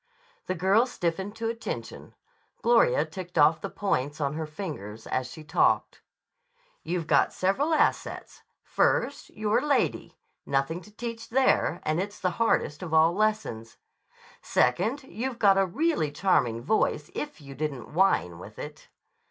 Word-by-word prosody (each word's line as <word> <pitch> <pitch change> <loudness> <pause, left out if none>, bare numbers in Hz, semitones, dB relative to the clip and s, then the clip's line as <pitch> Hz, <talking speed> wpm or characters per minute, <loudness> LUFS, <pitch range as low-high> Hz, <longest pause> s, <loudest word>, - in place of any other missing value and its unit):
The 185 - -1
girl 195 +8 +3
stiffened 190 -1 -3
to 225 0 -3
attention. 230 0 -6 0.5
Gloria - - +4
ticked 185 -2 -8
off 155 +2 +5
the 195 - -4
points 145 -9 -1
on 140 -1 -1
her 160 0 -4
fingers 145 - -7
as 130 0 -2
she 155 - -10
talked. 155 - +1 0.8
"You've 170 0 -3
got - - +3
several 230 - 0
assets. 315 - 0 0.2
First, - - 0
you're 215 +1 0
a - - -5
lady. 285 - 0 0.3
Nothing 140 +6 -1
to 210 - -16
teach 230 +1 -6
there, 260 -8 +2
and 155 +2 0
it's 205 +1 -6
the 180 - 0
hardest 155 -9 +1
of 165 -3 -2
all 160 +2 +5
lessons. 210 - -1 0.6
Second, 220 - +1
you've 260 -1 -5
got 195 -3 +5
a 195 - +3
really 290 - 0
charming 125 -9 +1
voice 220 - 0
if 295 -7 -5
you 140 -2 -10
didn't 140 -2 -5
whine 155 - +2
with 105 +4 -11
it. 150 0 -9
180 Hz, 150 wpm, -27 LUFS, 150-220 Hz, 0.8 s, off